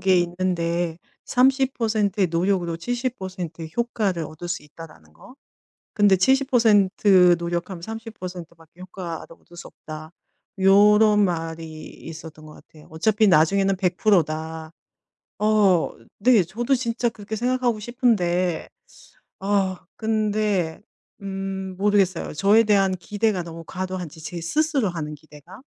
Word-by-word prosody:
게 190 Hz, -1 st, +4 dB
있는데 175 Hz, -1 st, -1 dB, 0.3 s
30% 245 Hz, -6 st, +1 dB
의 190 Hz, -, +4 dB
노력으로 170 Hz, 0 st, 0 dB
70% 190 Hz, -6 st, -4 dB
의 160 Hz, -, -7 dB
효과를 210 Hz, -8 st, -1 dB
얻을 155 Hz, +3 st, -9 dB
수 175 Hz, -, -3 dB
있다라는 150 Hz, -, -14 dB
거. 165 Hz, -, -16 dB, 0.6 s
근데 205 Hz, -2 st, +4 dB
70% 205 Hz, -7 st, +4 dB
노력하면 170 Hz, +1 st, -4 dB
30 185 Hz, -5 st, -8 dB
밖에 165 Hz, +2 st, -19 dB
효과를 180 Hz, -3 st, -7 dB
얻을 175 Hz, -, -19 dB
수 175 Hz, -, -9 dB
없다. 155 Hz, 0 st, -10 dB, 0.5 s
요런 210 Hz, +2 st, +5 dB
말이 165 Hz, -3 st, -4 dB
있었던 160 Hz, -1 st, -11 dB
것 155 Hz, -, -12 dB
같아요. 155 Hz, -1 st, -18 dB
어차피 210 Hz, +7 st, +2 dB
나중에는 195 Hz, +3 st, +3 dB
100% 185 Hz, 0 st, +3 dB
다. 160 Hz, +1 st, -6 dB, 0.7 s
어 210 Hz, -5 st, +3 dB, 0.3 s
네 235 Hz, 0 st, +5 dB
저도 235 Hz, +10 st, -2 dB
진짜 240 Hz, -1 st, -1 dB
그렇게 220 Hz, -1 st, -7 dB
생각하고 245 Hz, 0 st, 0 dB
싶은데 185 Hz, -8 st, 0 dB, 0.7 s
아 195 Hz, -2 st, 0 dB
근데 210 Hz, -6 st, 0 dB, 0.4 s
음 195 Hz, -1 st, -5 dB
모르겠어요. 195 Hz, -3 st, +1 dB
저에 200 Hz, +7 st, +4 dB
대한 195 Hz, -3 st, +3 dB
기대가 205 Hz, +1 st, -1 dB
너무 165 Hz, 0 st, -9 dB
과도한지 185 Hz, -4 st, -5 dB
제 170 Hz, +2 st, -6 dB
스스로 280 Hz, -, 0 dB
하는 155 Hz, -3 st, -5 dB
기대가. 155 Hz, -, -15 dB
190 Hz, 240 characters per minute, -23 LUFS, 170-215 Hz, 0.7 s, 요런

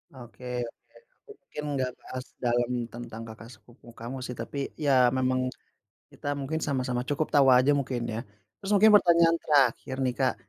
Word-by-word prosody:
Oke 125 Hz, 0 st, -12 dB, 0.8 s
oke. 425 Hz, -, -11 dB
Mungkin 150 Hz, -, -9 dB
nggak 130 Hz, -2 st, -1 dB
bahas 130 Hz, 0 st, -7 dB
dalam 120 Hz, 0 st, 0 dB, 0.2 s
tentang 115 Hz, -1 st, -8 dB
Kqakak 110 Hz, +1 st, -11 dB
sepupu 120 Hz, 0 st, -21 dB
kamu 120 Hz, +3 st, -7 dB
sih, 125 Hz, -, -5 dB
tapi 135 Hz, +4 st, -4 dB
ya 130 Hz, -5 st, +4 dB
memang 130 Hz, 0 st, +1 dB, 0.6 s
kita 145 Hz, -, -7 dB
mungkin 145 Hz, +3 st, -3 dB
sama-sama 130 Hz, -4 st, -1 dB
cukup 145 Hz, +2 st, -1 dB
tahu 140 Hz, -2 st, +5 dB
aja, 130 Hz, +2 st, +6 dB
mungkin, 135 Hz, -4 st, -1 dB
ya. 115 Hz, -1 st, -3 dB, 0.4 s
Terus 195 Hz, -, -5 dB
mungkin 215 Hz, +2 st, +6 dB
pertanyaan 170 Hz, -4 st, +5 dB
terakhir 130 Hz, -2 st, +2 dB
nih, 125 Hz, -, +1 dB
Kak, 130 Hz, -2 st, +2 dB
130 Hz, 160 wpm, -27 LUFS, 120-145 Hz, 0.8 s, aja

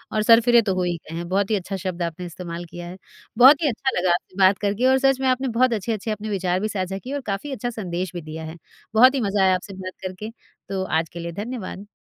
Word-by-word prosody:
और 215 Hz, -, +2 dB
सरफिरे 235 Hz, +1 st, +6 dB
तो 195 Hz, -4 st, -1 dB
हो 185 Hz, -, 0 dB
ही 175 Hz, -1 st, 0 dB
गए 165 Hz, -, -8 dB
हैं 170 Hz, 0 st, -4 dB
बहुत 200 Hz, +2 st, 0 dB
ही -, -, +4 dB
अच्छा 195 Hz, 0 st, -4 dB
शब्द 180 Hz, -2 st, -4 dB
आपने 170 Hz, +2 st, -4 dB
इस्तेमाल 175 Hz, 0 st, -7 dB
किया 175 Hz, +1 st, -9 dB
है। 180 Hz, +2 st, -9 dB, 0.4 s
बहुत 270 Hz, +7 st, +8 dB
ही -, -, +3 dB
अच्छा 265 Hz, +1 st, -2 dB
लगा 180 Hz, 0 st, +1 dB
आपसे 185 Hz, -, -4 dB
बात 190 Hz, 0 st, +5 dB
करके 205 Hz, +4 st, 0 dB
और 265 Hz, 0 st, +5 dB
सच 270 Hz, -1 st, +3 dB
में 265 Hz, -, +1 dB
आपने 260 Hz, +1 st, +1 dB
बहुत 255 Hz, -2 st, +4 dB
अच्छे-अच्छे 215 Hz, +1 st, -2 dB
अपने 215 Hz, 0 st, -4 dB
विचार 185 Hz, -2 st, 0 dB
भी 215 Hz, -, -1 dB
साझा 190 Hz, -1 st, -3 dB
किए 255 Hz, +7 st, -7 dB
और 285 Hz, -, -3 dB
काफ़ी 270 Hz, +9 st, -4 dB
अच्छा 245 Hz, 0 st, -3 dB
संदेश 185 Hz, -5 st, -4 dB
भी 175 Hz, -, -4 dB
दिया 155 Hz, +1 st, -7 dB
है। 160 Hz, +2 st, -7 dB, 0.4 s
बहुत 255 Hz, +4 st, +7 dB
ही 260 Hz, -, 0 dB
मज़ा 200 Hz, -2 st, +1 dB
आया 185 Hz, -1 st, +4 dB
आपसे 195 Hz, +2 st, -7 dB
बात 185 Hz, 0 st, -7 dB
करके 185 Hz, +4 st, -5 dB, 0.4 s
तो 190 Hz, -1 st, -2 dB
आज 160 Hz, -3 st, -1 dB
के 170 Hz, -, -9 dB
लिए 170 Hz, 0 st, -5 dB
धन्यवाद। 210 Hz, -4 st, -6 dB
195 Hz, 260 wpm, -23 LUFS, 180-230 Hz, 0.4 s, बहुत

